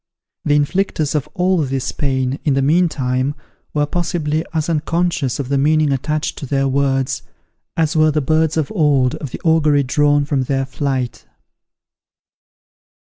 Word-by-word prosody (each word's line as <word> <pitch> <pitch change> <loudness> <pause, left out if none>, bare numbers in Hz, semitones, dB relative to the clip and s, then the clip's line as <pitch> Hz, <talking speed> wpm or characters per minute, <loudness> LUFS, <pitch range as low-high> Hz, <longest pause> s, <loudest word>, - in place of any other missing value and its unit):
The 145 - +3
inflictors 155 0 0
of 150 -4 -2
all 185 -1 +2
this 135 -3 -1
pain, 130 -2 -1
in 145 -3 +2
the 135 - +1
meantime, 140 -4 +1 0.4
were 150 -1 +1
possibly 160 -1 -1
as 160 -1 -1
unconscious 165 -4 0
of 135 -2 -4
the 140 -1 +1
meaning 155 +1 +3
attached 150 +3 -2
to 140 - -6
their 135 0 +1
words, 135 -1 0 0.6
as 160 -1 +1
were 155 0 +4
the 155 0 +1
birds 155 +2 +1
of 155 -3 -1
old 145 -9 +2
of 145 - -6
the - - -7
augury 155 -3 +3
drawn 145 +2 +2
from 140 -3 0
their 135 0 0
flight. 130 -3 -3
145 Hz, 150 wpm, -18 LUFS, 135-155 Hz, 0.6 s, were